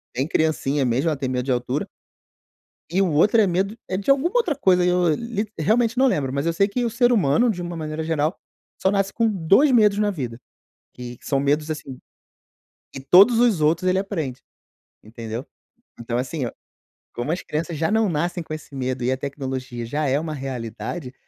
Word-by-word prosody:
bem 135 +4 -1
criancinha 145 -4 0
mesmo, 130 +7 +1
ela 150 - -1
tem 135 - -3
medo 125 0 -2
de 135 - -1
altura. 125 +4 -1 1.0
E 190 +3 +1
o 185 -4 +2
outro 205 +9 +4
é 205 - +4
medo, 190 +5 -1
eh, 185 - -1
de 200 +7 -1
alguma 280 +6 +3
outra 360 -11 +2
coisa, 185 -9 +3
eu 180 -3 +2
lite 220 -1 -4
realmente, 230 - +2
não 265 +1 +4
lembro. 135 - 0
Mas 140 +3 -2
eu 170 - +2
sei 200 +4 +2
que 245 +4 -2
o 230 - 0
ser 245 +1 +3
humano, 210 - +3
de 180 -4 -4
uma 175 -1 -5
maneira 155 0 -4
geral, 160 +1 -1 0.4
só 190 - +3
nasce 195 -1 0
com 230 0 +1
2 200 - +3
medos 210 -3 +4
na 210 -1 +2
vida. 125 -9 -5 0.6
E 125 -1 -8
que - - -20
são 135 -2 +1
medos, 150 +3 0
assim 135 -4 -6 1.0
e 135 - -6
todos 195 - +6
os 230 -8 +3
outros, 165 +4 +2
ele 185 +1 +2
aprende. 160 -11 -4 0.6
Entendeu. 115 +2 -7 0.5
Então 120 0 -3
assim, 130 +3 -3
eu 120 - -3 0.6
como 120 +6 -3
as 175 - -2
crianças 160 +1 -4
já 160 +6 0
não 220 -1 +3
nascem 175 +2 -1
com 155 - -7
esse 155 -2 -9
medo 130 -1 -3
e 125 - +1
a 130 - 0
tecnologia 130 -3 -5
já 150 +5 -2
é 135 +2 +2
uma 155 0 -3
realidade, 130 +2 -5
160 Hz, 205 wpm, -22 LUFS, 135-200 Hz, 1.0 s, todos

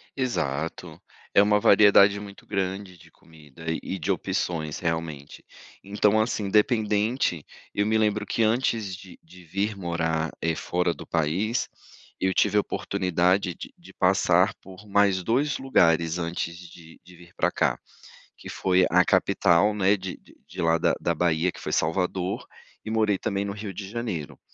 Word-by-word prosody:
Exato. 80 - -3 0.3
É 100 - +7
uma 105 0 +3
variedade 100 0 +6
muito 100 -1 -11
grande, 95 -1 -3
de - - -19
comida 80 -1 -16 0.2
e 95 - -4
de 75 - -1
opções, 80 -3 -2
realmente. 80 -4 -4 0.4
Então, 105 +2 +2
assim, 110 -1 -1
independente, 105 - +1 0.3
eu 105 - +1
me 110 +1 +1
lembro, 105 -1 +1
que 115 - -2
antes 110 -3 0
de 95 -1 -14
de 90 +2 -16
vir 100 +6 -2
morar, 80 -3 -2
eh, 80 0 0
fora 90 +1 -1
do - - -11
país, 90 +9 -1 0.5
eu 95 0 +1
tive 105 - +2
a - - +5
oportunidade, 90 -1 0
de - - -10
de - - -16
passar, - - +3
por 95 +2 -13
mais 100 -2 +2
2 130 +8 +1
lugares, 85 -10 +2
antes 85 0 -3
de 85 -2 -14
de 90 - -16
vir 85 0 -17
pra - - +1
cá, - - 0 0.6
que - - -11
foi 95 -1 +2
a 90 +1 +4
capital, 95 +1 +3
né, 100 0 +3
de 95 -2 -7 0.3
de - - -6
lá 85 0 +3
da - - +2
da 85 - 0
Bahia, 85 +1 +1
que - - -13
foi - - -5
Salvador, 90 +3 -1 0.4
e - - -6
morei 110 -3 +1
também, 100 0 -2
no 100 - -4
Rio 105 0 -6
de 95 +1 -7
Janeiro. 105 -9 -5
95 Hz, 160 wpm, -25 LUFS, 85-105 Hz, 0.6 s, É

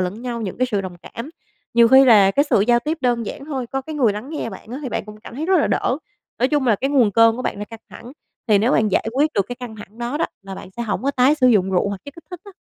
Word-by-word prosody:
lẫn 185 +6 -3
nhau, 240 -2 -4
những 195 +2 -5
cái 255 - +2
sự 205 -2 0
đồng 185 -2 -7
cảm. 245 +7 -8 0.4
Nhiều 235 -1 +6
khi 265 +2 +7
là 205 -6 +6
cái 285 +7 +2
sự - - +4
giao 240 +3 +3
tiếp 310 +5 -3
đơn 240 -3 0
giản 275 - -7
thôi, 265 -5 -4
có 270 +3 -3
cái 315 +2 -7
người 240 -8 +2
lắng 210 +6 -7
nghe 300 -7 -4
bạn 195 - -11
á 255 - -5
thì 260 - -3
bạn 235 - -3
cũng 210 0 -11
cảm 235 - -11
thấy 310 +5 -4
rất 380 -1 +3
là - - +1
đỡ. 255 +4 0 0.4
Nói 255 +2 +2
chung 290 -4 0
là 220 - +3
cái 270 +7 -2
nguồn 250 -7 +3
cơn 230 +1 +5
của 255 - -5
bạn 200 - -3
là 205 - -4
căng 225 +1 -12
thẳng, 245 +3 -11 0.3
thì 210 -3 +4
nếu 235 +6 +2
bạn 220 - +3
giải - - +1
quyết 295 +4 +1
được 200 -1 +1
cái 245 - -6
căng 245 -4 -8
thẳng 210 +2 -13
đó 240 +4 -3
đó, - - +1 0.2
là 195 0 -8
bạn 190 - -10
sẽ 235 - -3
hổng 210 -2 -3
có 275 - +1
tái 270 +2 +3
sử 260 -4 +2
dụng 190 -5 +3
rượu 185 +2 +1
hoặc 200 -1 -5
chất 285 - -10
kích 335 - -14
thích 360 - -8
á. 400 - -12
240 Hz, 320 wpm, -20 LUFS, 210-270 Hz, 0.4 s, khi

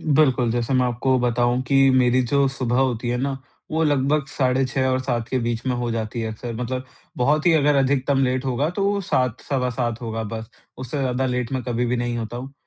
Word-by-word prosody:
बिल्कुल, 130 -6 +3
जैसे 120 +2 -1
मैं 130 -1 +3
आपको 125 +2 +1
बताऊँ 120 +1 +1
कि 135 +1 +4
मेरी 125 +1 +3
जो 140 -1 +4
सुबह 125 -2 -1
होती 125 -3 0
है 120 - 0
ना, 135 0 -1 0.3
वो 160 +1 +1
लगभग 145 0 +2
साढ़े 130 -1 +1
6 130 +1 -1
और 130 0 +1
7 120 -3 -2
के 130 - -1
बीच 120 0 -2
में 125 - +1
हो 120 -1 -2
जाती 115 0 -3
है 110 -1 -3
अक्सर 115 +2 -6
मतलब 130 +1 -3 0.3
बहुत 150 +6 +2
ही 175 - +5
अगर 150 -2 +3
अधिकतम 135 0 +2
लेट 130 +1 0
होगा 135 +4 0
तो 200 +2 0
7, 125 - 0
सवा 130 -3 -1
7 120 -2 -2
होगा 115 -1 -3
बस, 110 +1 -6 0.3
उससे 130 +3 -5
ज़्यादा 130 -1 0
लेट 125 -1 -2
मैं 130 -1 -1
कभी 120 +1 -1
भी 120 +1 0
नहीं 120 0 -2
होता 115 +1 -5
हूँ। 135 +3 -8
125 Hz, 225 wpm, -22 LUFS, 120-135 Hz, 0.3 s, ही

